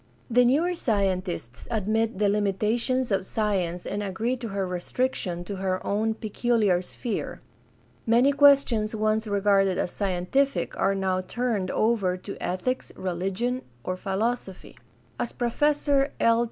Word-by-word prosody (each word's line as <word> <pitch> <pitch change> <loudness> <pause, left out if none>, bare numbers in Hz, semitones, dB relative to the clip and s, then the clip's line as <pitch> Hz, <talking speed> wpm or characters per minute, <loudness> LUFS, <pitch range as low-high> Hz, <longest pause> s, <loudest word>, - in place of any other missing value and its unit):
The 245 +1 +5
newer 310 +9 +3
scientists 185 - -2
admit 220 0 0
the 205 0 +2
limitations 215 +5 0
of 190 -1 0
science 185 -5 -1
and 205 - -3
agree 220 +5 -1
to 240 - -6
her 195 -2 -2
restriction 180 0 -2
to 195 +2 -6
her 185 -1 -1
own 220 +2 0
peculiar 215 -4 +1
sphere. 220 +4 -4 0.7
Many 240 +5 +5
questions 275 -7 +4
once 215 +1 0
regarded 200 -2 +2
as - - -1
scientific 200 +9 0
are 195 - +1
now 190 -1 0
turned 215 -1 -2
over 205 -5 +1
to 195 +2 -8
ethics, 220 +8 -2
religion, 195 +8 -2 0.2
or 185 - -2
philosophy. 195 +1 -3 0.4
As 240 - -2
Professor 285 +3 +1
L. 230 0 +4
210 Hz, 130 wpm, -26 LUFS, 190-240 Hz, 0.7 s, The